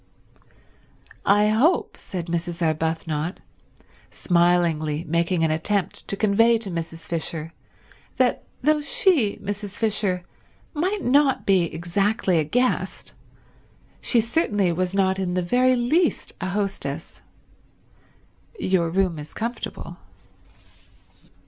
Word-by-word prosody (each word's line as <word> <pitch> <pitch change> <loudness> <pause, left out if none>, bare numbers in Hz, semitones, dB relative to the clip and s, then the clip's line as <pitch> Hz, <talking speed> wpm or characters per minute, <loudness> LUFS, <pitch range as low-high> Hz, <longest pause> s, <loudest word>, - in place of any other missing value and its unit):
"I 205 +1 +5
hope," 255 +12 +2
said 180 -3 -6
Mrs. 170 0 -3
Arbuthnot, 160 +1 -1 0.7
smilingly 170 -3 +1
making 170 +1 0
an 160 - +2
attempt 190 +5 -1
to 200 - -2
convey 225 +3 +4
to 215 -4 -6
Mrs. 165 -1 -5
Fisher 165 -1 -4 0.6
that 255 -1 +2 0.2
though 305 +1 +3
she, 285 - +2
Mrs. 205 0 -5
Fisher, 205 -5 0 0.5
might 370 +7 -1
not 270 +1 +3
be 190 -3 +4
exactly 185 +2 0
a - - +2
guest 245 - -1 0.9
she 240 - +2
certainly 215 - +1
was 180 +2 -1
not 190 -1 +2
in 180 -2 -1
the 180 - 0
very 255 +7 +3
least 300 +8 +1
a 185 - -2
hostess, 190 -6 -3 1.4
"your 185 - +1
room 180 -2 0
is 150 +1 -10
comfortable." 235 +2 -5
190 Hz, 110 wpm, -23 LUFS, 170-230 Hz, 1.4 s, I